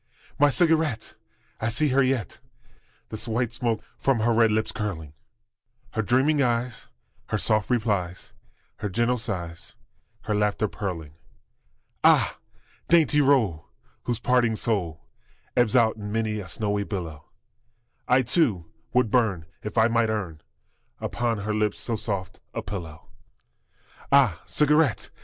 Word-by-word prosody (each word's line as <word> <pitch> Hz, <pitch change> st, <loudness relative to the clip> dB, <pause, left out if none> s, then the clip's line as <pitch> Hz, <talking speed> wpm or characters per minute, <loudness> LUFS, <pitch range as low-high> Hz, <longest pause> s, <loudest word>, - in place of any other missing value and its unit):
My 145 Hz, -, +6 dB
cigarette! 155 Hz, -, +1 dB, 0.5 s
I 110 Hz, -, 0 dB
see 150 Hz, +6 st, +1 dB
her 135 Hz, +1 st, +3 dB
yet, 130 Hz, -7 st, -1 dB, 0.7 s
The 110 Hz, -, -5 dB
white 115 Hz, +1 st, -1 dB
smoke 115 Hz, -3 st, -1 dB, 0.2 s
from 135 Hz, -5 st, +2 dB
her 115 Hz, +1 st, +3 dB
red 115 Hz, 0 st, +4 dB
lips 110 Hz, +1 st, 0 dB
curling, 90 Hz, -9 st, -4 dB, 0.8 s
Her 110 Hz, -, -1 dB
dreaming 135 Hz, +7 st, +2 dB
eyes, 120 Hz, -2 st, -1 dB, 0.4 s
her -, -, -1 dB
soft 110 Hz, -1 st, +1 dB
replies, 105 Hz, -7 st, -1 dB, 0.4 s
Her 105 Hz, 0 st, -3 dB
gentle 120 Hz, +5 st, +1 dB
sighs, 90 Hz, -7 st, -6 dB, 0.5 s
her 105 Hz, -, -2 dB
laughter 105 Hz, +1 st, +1 dB
purling! 85 Hz, -8 st, -5 dB, 0.9 s
Ah, -, -, +4 dB, 0.5 s
dainty 155 Hz, -3 st, +5 dB
roll, 115 Hz, -, +2 dB, 0.4 s
whose 120 Hz, -2 st, -1 dB
parting 120 Hz, -2 st, +2 dB
soul 85 Hz, -10 st, -2 dB, 0.5 s
Ebbs 120 Hz, -3 st, +3 dB
out 115 Hz, -3 st, +4 dB
in 105 Hz, -1 st, -6 dB
many 110 Hz, -1 st, -1 dB
a 95 Hz, -, -7 dB
snowy 100 Hz, +3 st, -1 dB
billow, 85 Hz, -8 st, -6 dB, 0.8 s
I, 130 Hz, +1 st, +4 dB
too, 115 Hz, -, +1 dB, 0.3 s
would 125 Hz, -3 st, +2 dB
burn 105 Hz, -10 st, +1 dB, 0.2 s
if 105 Hz, -, -6 dB
I 110 Hz, -, +6 dB
might 115 Hz, -1 st, +2 dB
earn 90 Hz, -8 st, -3 dB, 0.6 s
Upon 120 Hz, -2 st, -1 dB
her 105 Hz, +2 st, -2 dB
lips 105 Hz, -1 st, 0 dB
so 115 Hz, -, -2 dB
soft 100 Hz, -4 st, -4 dB, 0.2 s
a -, -, -3 dB
pillow! 85 Hz, -6 st, -7 dB, 1.0 s
Ah, 125 Hz, -, +4 dB
cigarette! 150 Hz, -4 st, +2 dB
110 Hz, 135 wpm, -25 LUFS, 100-125 Hz, 1.0 s, My